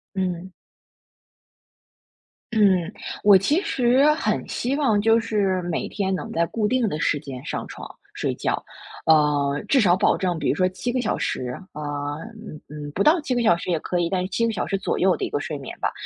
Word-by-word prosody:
嗯。 185 Hz, -1 st, -2 dB, 2.0 s
嗯， 195 Hz, -5 st, +3 dB, 0.3 s
我 200 Hz, -2 st, +8 dB
其 285 Hz, -, +2 dB
实 255 Hz, +2 st, +3 dB
很 320 Hz, -, -1 dB
希 255 Hz, +3 st, -2 dB
望 225 Hz, -9 st, +2 dB
就 225 Hz, +1 st, +4 dB
是 200 Hz, -5 st, 0 dB
每 175 Hz, -2 st, -2 dB
天 190 Hz, -2 st, -1 dB
能 185 Hz, -, -4 dB
在 170 Hz, +1 st, +1 dB
固 210 Hz, +3 st, -1 dB
定 250 Hz, -2 st, +1 dB
的 155 Hz, -4 st, -3 dB
时 150 Hz, -, +1 dB
间 135 Hz, -1 st, -8 dB
上 -, -, -4 dB
床 -, -, -9 dB, 0.2 s
睡 -, -, -2 dB
觉， -, -, -2 dB, 0.4 s
呃， 150 Hz, -2 st, +3 dB
至 270 Hz, -3 st, +4 dB
少 175 Hz, -4 st, +5 dB
保 195 Hz, -, +3 dB
证 180 Hz, -3 st, -1 dB
比 -, -, -1 dB
如 -, -, +2 dB
说 185 Hz, +3 st, +2 dB
7 185 Hz, +6 st, -5 dB
个 250 Hz, 0 st, 0 dB
小 -, -, -1 dB
时 125 Hz, 0 st, -3 dB
呃， 150 Hz, -, -7 dB, 0.7 s
嗯 155 Hz, -, -9 dB
嗯， 150 Hz, 0 st, -7 dB
不 200 Hz, -, +1 dB
到 320 Hz, +4 st, +5 dB
7 255 Hz, -4 st, -2 dB
个 240 Hz, -, +1 dB
小 175 Hz, -6 st, +4 dB
时 170 Hz, -, -6 dB
也 170 Hz, -, +2 dB
可 175 Hz, +2 st, -2 dB
以 170 Hz, -1 st, 0 dB
但 185 Hz, -1 st, 0 dB
是 185 Hz, -, -3 dB
7 230 Hz, +4 st, 0 dB
个 225 Hz, -, -1 dB
小 -, -, -2 dB
时 195 Hz, -, -1 dB
左 -, -, -2 dB
右 185 Hz, 0 st, +3 dB
的 -, -, -2 dB
一 -, -, -5 dB
个 -, -, -1 dB
睡 150 Hz, -1 st, -4 dB
眠 135 Hz, -, -8 dB
吧。 -, -, 0 dB
185 Hz, 215 characters per minute, -23 LUFS, 165-225 Hz, 2.0 s, 我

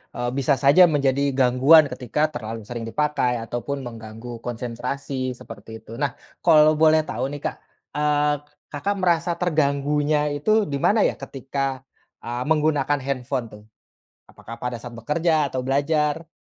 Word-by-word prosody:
eee, 120 Hz, 0 st, -2 dB
bisa 140 Hz, +1 st, +2 dB
saja 140 Hz, +6 st, +6 dB
menjadi 140 Hz, -4 st, +1 dB, 0.2 s
gangguan 135 Hz, +5 st, +6 dB
ketika 125 Hz, +3 st, -3 dB
terlalu 115 Hz, -2 st, -5 dB
sering 120 Hz, -1 st, -5 dB
dipakai 150 Hz, -2 st, 0 dB
ataupun 120 Hz, +5 st, -4 dB
mengganggu 115 Hz, +1 st, -9 dB
konsentrasi 125 Hz, +2 st, -4 dB
seperti 110 Hz, 0 st, -11 dB
itu. 110 Hz, -, -16 dB
Nah 145 Hz, -, +1 dB, 0.3 s
kalau 155 Hz, -2 st, +6 dB
boleh 155 Hz, 0 st, +5 dB
tahu 120 Hz, -, -3 dB
nih 145 Hz, -, -6 dB
Kak, -, -, -1 dB, 0.4 s
eee, 150 Hz, 0 st, +2 dB
k -, -, -30 dB, 0.2 s
Kakak 195 Hz, +8 st, -2 dB
merasa 175 Hz, -1 st, +2 dB
terganggunya 150 Hz, -2 st, +1 dB
itu 215 Hz, +9 st, +2 dB
di 140 Hz, -, -3 dB
mana 220 Hz, -, +4 dB
ya -, -, -3 dB
ketika, 135 Hz, 0 st, -4 dB, 0.4 s
eee, 120 Hz, +1 st, -4 dB
menggunakan 150 Hz, -2 st, +2 dB
handphone 130 Hz, -1 st, -3 dB
tuh? 105 Hz, 0 st, -13 dB, 0.7 s
Apakah 115 Hz, +1 st, -11 dB
pada 125 Hz, -1 st, -3 dB
saat 120 Hz, 0 st, -9 dB
bekerja 155 Hz, +4 st, +1 dB
atau 130 Hz, 0 st, -3 dB
belajar? 150 Hz, +3 st, 0 dB
140 Hz, 145 wpm, -23 LUFS, 125-150 Hz, 0.7 s, saja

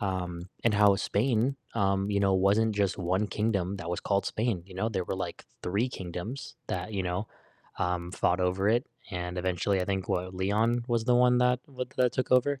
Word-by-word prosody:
Um, 90 Hz, -3 st, -3 dB, 0.2 s
and 115 Hz, -, +4 dB
how 100 Hz, -1 st, +6 dB
Spain, 120 Hz, +6 st, +1 dB, 0.2 s
um, 100 Hz, -2 st, +1 dB
you 100 Hz, -1 st, +1 dB
know, 100 Hz, -1 st, +3 dB
wasn't 105 Hz, +4 st, +3 dB
just 100 Hz, -2 st, +1 dB
1 95 Hz, +3 st, +1 dB
kingdom 100 Hz, -3 st, -1 dB
that 85 Hz, -3 st, -5 dB
was 90 Hz, -, -1 dB
called 100 Hz, -1 st, +1 dB
Spain, 110 Hz, -5 st, -1 dB
you 95 Hz, -, -12 dB
know, 95 Hz, +4 st, 0 dB
there 95 Hz, -5 st, -2 dB
were, 95 Hz, -, -3 dB
like, 90 Hz, -2 st, -5 dB, 0.2 s
3 100 Hz, +8 st, 0 dB
kingdoms 95 Hz, +5 st, -6 dB
that, 90 Hz, +4 st, -3 dB
you 100 Hz, -2 st, -1 dB
know, 90 Hz, +3 st, -2 dB, 0.5 s
um, 90 Hz, 0 st, -1 dB
fought 90 Hz, 0 st, +1 dB
over 90 Hz, +2 st, +1 dB
it, 120 Hz, +3 st, +2 dB, 0.2 s
and 90 Hz, -1 st, -4 dB
eventually 95 Hz, +2 st, 0 dB
I -, -, 0 dB
think 95 Hz, -1 st, -2 dB
what 90 Hz, +1 st, -1 dB
Leon 110 Hz, +6 st, +1 dB
was 115 Hz, -2 st, +1 dB
the 125 Hz, +1 st, +3 dB
one 125 Hz, 0 st, +5 dB
that 125 Hz, 0 st, +3 dB
w 130 Hz, -3 st, -4 dB
that 125 Hz, -1 st, +3 dB
took 130 Hz, -, -1 dB
over 130 Hz, +3 st, +4 dB
it. 135 Hz, -, -15 dB
100 Hz, 210 wpm, -29 LUFS, 90-115 Hz, 0.5 s, how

